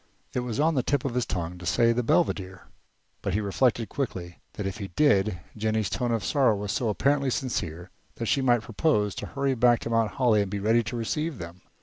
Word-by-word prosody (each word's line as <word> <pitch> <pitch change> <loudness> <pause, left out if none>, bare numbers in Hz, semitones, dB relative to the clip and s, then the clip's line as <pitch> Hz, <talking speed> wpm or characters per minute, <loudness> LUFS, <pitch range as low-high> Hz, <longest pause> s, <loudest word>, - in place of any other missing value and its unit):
It - - 0
was 125 -1 -3
on 160 +2 +3
the 135 - +2
tip 140 +2 0
of 130 - -1
his 125 -1 0
tongue 90 0 -4
to 90 - -9
say 115 +4 +3
the 120 - 0
Belvedere, 105 - 0 0.6
but 100 -2 -1
he - - +2
reflected 110 +3 +1
quickly 90 -10 -5
that 105 - -5
if 95 +1 -3
he 100 - -4
did 100 - +2 0.2
Jennie's 110 -2 -1
tone 120 -1 -1
of 115 -5 -1
sorrow 125 +2 +3
was 100 0 -3
so 120 - 0
apparently 140 +5 +1
sincere 90 - -3 0.2
that 115 - -4
she 135 - +2
might 120 -3 +3
propose 105 - 0
to - - -6
hurry 140 -1 -1
back 120 -1 +4
to 115 - -4
Mount 115 -1 +1
Holly 120 -6 +3
and 100 - -2
be 100 - -3
ready 110 +4 +3
to 120 +2 -4
receive 150 +6 -2
them. 85 0 -9
115 Hz, 225 wpm, -27 LUFS, 100-130 Hz, 0.6 s, back